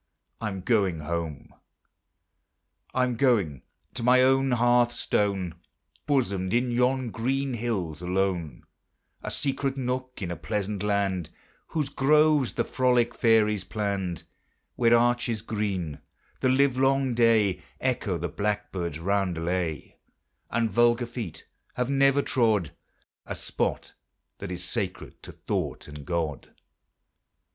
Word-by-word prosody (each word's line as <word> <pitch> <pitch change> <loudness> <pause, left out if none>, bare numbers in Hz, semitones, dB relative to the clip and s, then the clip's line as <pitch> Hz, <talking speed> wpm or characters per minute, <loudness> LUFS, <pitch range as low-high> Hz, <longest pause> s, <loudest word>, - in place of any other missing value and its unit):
I'm 100 -4 -3
going 95 -6 +1
home. 80 -2 -4 1.4
I'm 125 -2 0
going 100 - +2 0.3
to 125 - -5
my 125 +2 +5
own 135 +1 +3
hearth 120 0 +3
stone, 95 -7 0 0.5
Bosomed 100 -9 +1
in 125 +1 +1
yon 125 0 +1
green 135 +4 -1
hills 100 -10 -3
alone, 90 -6 -1 0.6
A - - -4
secret 135 -1 -2
nook 130 0 -3
in 90 - -3
a - - -3
pleasant 105 0 -3
land, 100 -4 0 0.4
Whose 150 -4 -2
groves 150 -1 +3
the - - 0
frolic 125 -2 +2
fairies 105 -3 +3
planned; 95 -2 -3 0.5
Where 120 -1 +5
arches 120 -2 +1
green, 95 -9 -3 0.4
the 130 - +2
livelong 135 0 +3
day, 110 -5 +3 0.2
Echo 120 -8 -1
the 85 +2 -2
blackbird's 90 -3 -2
roundelay, 90 -3 -1 0.5
And 115 -1 0
vulgar 120 +1 +3
feet 115 -9 -7 0.3
have 125 +2 -1
never 140 0 +4
trod 110 - +1 0.6
A - - -4
spot - - -2 0.5
that - - -6
is 90 0 -5
sacred 95 0 -4
to - - -10
thought - - -3
and 75 -1 -10
God. 80 -7 -3
110 Hz, 120 wpm, -27 LUFS, 90-125 Hz, 1.4 s, my